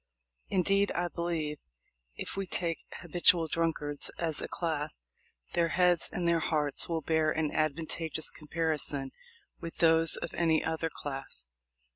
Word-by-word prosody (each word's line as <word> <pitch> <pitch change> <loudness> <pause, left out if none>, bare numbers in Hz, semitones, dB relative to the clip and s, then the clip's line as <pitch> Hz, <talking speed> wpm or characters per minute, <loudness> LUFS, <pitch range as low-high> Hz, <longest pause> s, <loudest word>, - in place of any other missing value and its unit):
Indeed, 195 +2 +2
I 175 0 -1
believe, 165 -4 -3 0.6
if - - -4
we 195 -1 -3
take 170 -2 -2 0.2
habitual 170 0 +4
drunkards 155 -3 -1
as 165 -3 -1
a - - -3
class, 155 - -3 0.5
their 170 -1 +3
heads 175 0 +3
and 175 -1 -2
their 170 -1 +3
hearts 150 -2 0
will 165 -1 -1
bear 160 0 +1
an 155 -1 0
advantageous 160 +1 -1
comparison 150 -3 -1 0.5
with 165 - -7
those 165 -1 +5
of - - -5
any 160 -2 +2
other 160 0 -1
class." 135 - -5
160 Hz, 135 wpm, -30 LUFS, 150-170 Hz, 0.6 s, those